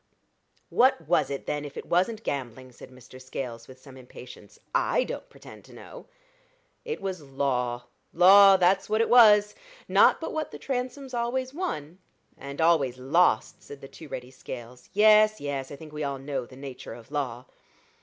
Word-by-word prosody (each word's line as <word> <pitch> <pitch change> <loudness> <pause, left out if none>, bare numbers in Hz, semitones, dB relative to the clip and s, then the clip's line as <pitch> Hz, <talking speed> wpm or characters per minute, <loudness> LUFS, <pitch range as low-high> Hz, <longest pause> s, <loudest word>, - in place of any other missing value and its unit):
"What 245 - +2
was 175 - +2
it, 140 -1 -5
then, 150 0 -3
if 145 -1 -9
it - - -7
wasn't 200 +6 0
gambling?" 130 -2 -5
said 120 - -14
Mr. 130 0 -15
Scales, 125 -3 -7
with 130 0 -14
some 130 -1 -15
impatience. 125 -1 -13 0.2
"I - - +1
don't - - -7
pretend - - -14
to - - -17
know." - - -12 0.8
"It 460 -1 -5
was 190 -3 -4
law 130 -3 -2 0.3
law 195 +3 +7
that's 190 +2 +2
what 215 +1 +2
it 230 - 0
was. 210 -4 +6 0.3
Not - - +4
but 325 - -5
what 315 -1 -3
the - - -9
Transomes 260 +1 -5
always 255 +2 -2
won." 185 - -5 0.4
"And 140 +2 -9
always 155 -7 +2
lost," 150 +8 +1
said 140 - -12
the 135 - -11
too 155 - -13
ready 125 -2 -8
Scales. 125 -1 -10
"Yes, 215 +1 +5
yes; 140 -2 -4
I - - -8
think 155 +1 -13
we 150 0 -4
all 140 -1 -3
know 135 -2 -5
the 130 - -15
nature 135 -4 -9
of 120 +3 -15
law." 130 -4 -4
145 Hz, 175 wpm, -26 LUFS, 130-210 Hz, 0.8 s, law